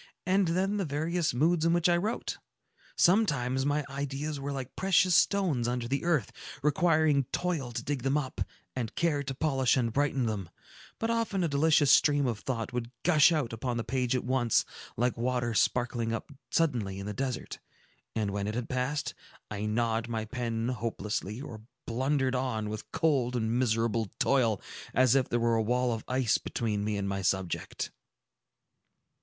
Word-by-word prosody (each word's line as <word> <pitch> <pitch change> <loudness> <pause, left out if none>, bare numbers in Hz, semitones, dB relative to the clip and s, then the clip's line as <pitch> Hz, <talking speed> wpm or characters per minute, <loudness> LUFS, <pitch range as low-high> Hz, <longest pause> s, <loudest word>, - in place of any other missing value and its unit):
"And 190 +1 +3
then 190 +5 +1
the 200 - 0
various 160 +3 0
moods 160 +6 +2
in 165 0 +3
which 175 0 +3
I 175 - +4
wrote! 205 +7 -2 0.6
Sometimes 140 - +2
my 145 0 0
ideas 140 +2 -4
were 140 +1 -4
like 135 -2 -5
precious 185 -1 +3
stones 165 - +3
under 120 -1 -2
the 140 +3 -1
earth, 165 -6 +1 0.3
requiring 155 -3 +3
toil 165 -9 -1
to 120 0 -4
dig 140 -2 -2
them 135 +3 +1
up, 135 -3 -4 0.3
and 120 -4 -3
care 160 -4 +1
to 135 -1 -4
polish 135 -3 +2
and 115 -3 0
brighten 135 -2 +1
them; 100 -6 -3 0.5
but 225 +1 -1
often 225 -5 0
a - - +2
delicious 150 -1 +4
stream 145 -2 +5
of 115 -4 -1
thought 120 -2 -3
would 120 -1 -3
gush 160 -2 +6
out 145 -8 0
upon 120 +1 -2
the 115 - -1
page 130 -1 0
at 125 - -1
once, 125 -2 +2 0.3
like 125 +2 +1
water 120 -1 0
sparkling 120 0 +1
up 115 +6 -4 0.2
suddenly 120 -12 0
in 100 - -6
the 105 - -4
desert; 130 +3 -4 0.6
and 105 -3 0
when 100 0 -2
it 105 - -3
had 120 -1 -3
passed, 130 +4 -2 0.4
I 105 0 -3
gnawed 115 +1 0
my 110 -2 -3
pen 115 -1 -2
hopelessly, 110 -2 -3
or 115 -6 -8 0.2
blundered 130 +2 0
on 125 -5 -1
with 110 0 -7
cold 145 -7 +1
and 110 -2 0
miserable 115 -3 +1
toil, 115 -7 +2 0.4
as 130 -2 +5
if 135 -2 +2
there 120 - +1
were 115 -1 +2
a - - +2
wall 125 +2 +1
of 115 - -5
ice 125 -3 +2
between 105 -3 -2
me 105 0 -1
and 100 -1 -2
my 100 0 -2
subject." 95 -2 -2
130 Hz, 175 wpm, -29 LUFS, 115-150 Hz, 0.6 s, gush